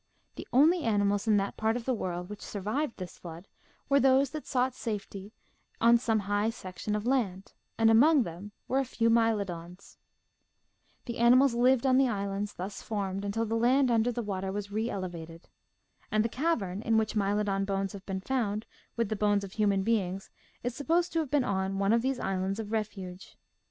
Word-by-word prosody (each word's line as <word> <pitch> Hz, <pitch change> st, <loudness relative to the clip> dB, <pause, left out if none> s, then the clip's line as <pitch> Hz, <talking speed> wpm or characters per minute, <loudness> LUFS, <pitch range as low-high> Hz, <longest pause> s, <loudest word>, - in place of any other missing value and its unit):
The -, -, -8 dB
only 315 Hz, +8 st, +5 dB
animals 205 Hz, -3 st, +1 dB
in 215 Hz, -1 st, +4 dB
that 200 Hz, 0 st, -2 dB
part 220 Hz, +1 st, +1 dB
of 235 Hz, -, -7 dB
the 260 Hz, -, +1 dB
world 180 Hz, -5 st, -3 dB
which 210 Hz, +1 st, -9 dB
survived 220 Hz, +7 st, -3 dB
this 180 Hz, -2 st, -8 dB
flood 170 Hz, +2 st, -10 dB, 0.4 s
were 280 Hz, 0 st, +4 dB
those 270 Hz, 0 st, +4 dB
that 310 Hz, -1 st, -7 dB
sought 255 Hz, -1 st, +1 dB
safety 205 Hz, -4 st, -6 dB, 0.5 s
on 235 Hz, +1 st, +5 dB
some 225 Hz, -3 st, +1 dB
high 205 Hz, +2 st, 0 dB
section 200 Hz, -1 st, -5 dB
of 210 Hz, +1 st, -3 dB
land, 215 Hz, -8 st, -1 dB, 0.2 s
and 225 Hz, 0 st, +5 dB
among 280 Hz, +5 st, +6 dB
them 180 Hz, +3 st, -8 dB, 0.2 s
were 265 Hz, -, +1 dB
a -, -, +2 dB
few 230 Hz, -2 st, +1 dB
Mylodons. 200 Hz, -6 st, -1 dB, 1.1 s
The 235 Hz, 0 st, -5 dB
ani 235 Hz, +1 st, +6 dB
mals 265 Hz, -1 st, +5 dB
lived 250 Hz, +1 st, +3 dB
on 260 Hz, 0 st, +4 dB
the 270 Hz, -, +4 dB
islands 200 Hz, -1 st, -3 dB
thus 190 Hz, +3 st, -6 dB
formed 200 Hz, -2 st, -3 dB
until 215 Hz, +3 st, -1 dB
the 225 Hz, -, -3 dB
land 250 Hz, +3 st, +3 dB
under 230 Hz, +1 st, +2 dB
the 240 Hz, 0 st, -3 dB
water 190 Hz, -2 st, -3 dB
was 200 Hz, 0 st, -4 dB
reelevated. 180 Hz, -6 st, -4 dB, 0.7 s
And 215 Hz, +1 st, +2 dB
the -, -, 0 dB
cavern 225 Hz, -, -1 dB
in 225 Hz, 0 st, +2 dB
which 220 Hz, -1 st, +1 dB
Mylodon 200 Hz, -1 st, 0 dB
bones 195 Hz, -1 st, -2 dB
have 195 Hz, -1 st, -10 dB
been 190 Hz, -1 st, -3 dB
found 220 Hz, -3 st, -1 dB, 0.3 s
with 230 Hz, -2 st, 0 dB
the 215 Hz, -, -1 dB
bones 205 Hz, -1 st, +1 dB
of 195 Hz, -, -7 dB
human 200 Hz, -2 st, +1 dB
beings 195 Hz, -3 st, -1 dB, 0.3 s
is 245 Hz, 0 st, -2 dB
supposed 330 Hz, +6 st, 0 dB
to 330 Hz, -, +1 dB
have 310 Hz, -4 st, -2 dB
been 285 Hz, -1 st, +2 dB
on 190 Hz, -2 st, -1 dB
one 200 Hz, +2 st, +2 dB
of 230 Hz, -, +3 dB
these 260 Hz, 0 st, -1 dB
islands 190 Hz, +1 st, -2 dB
of 215 Hz, -1 st, -5 dB
refuge. 195 Hz, -4 st, -5 dB
215 Hz, 190 wpm, -29 LUFS, 195-240 Hz, 1.1 s, among